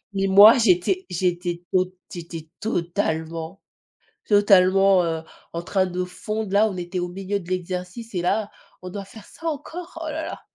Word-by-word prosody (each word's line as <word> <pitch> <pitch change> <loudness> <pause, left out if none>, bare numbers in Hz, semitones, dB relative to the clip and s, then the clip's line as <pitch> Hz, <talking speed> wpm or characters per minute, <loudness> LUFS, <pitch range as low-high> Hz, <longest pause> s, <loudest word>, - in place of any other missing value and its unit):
Mais 195 0 +1
moi 205 +6 +9
j'étais 230 - +2
j'étais 175 -1 -1
tot 185 0 +1 0.2
j'étais 165 -2 -8
totalement 165 -3 -2 0.7
totalement, 195 -2 +5
heu, 165 -1 -2 0.3
en 170 - -3
train 190 +1 +1
de 180 0 -2
fondre 215 +3 -5
là, 210 +2 +4
on 195 - -6
était 180 +1 -4
au 175 - -2
milieu 195 +2 -3
de 175 - -13
l'exercice 185 +5 -4
et 180 - 0
là 210 +3 0 0.3
«on 180 - -7
doit 200 +1 -6
faire 215 0 -13
ça, 330 - -11
encore? 330 +3 -6
Oh 315 - -4
là 315 +1 -4
là!» - - -7
185 Hz, 170 wpm, -23 LUFS, 175-205 Hz, 0.7 s, moi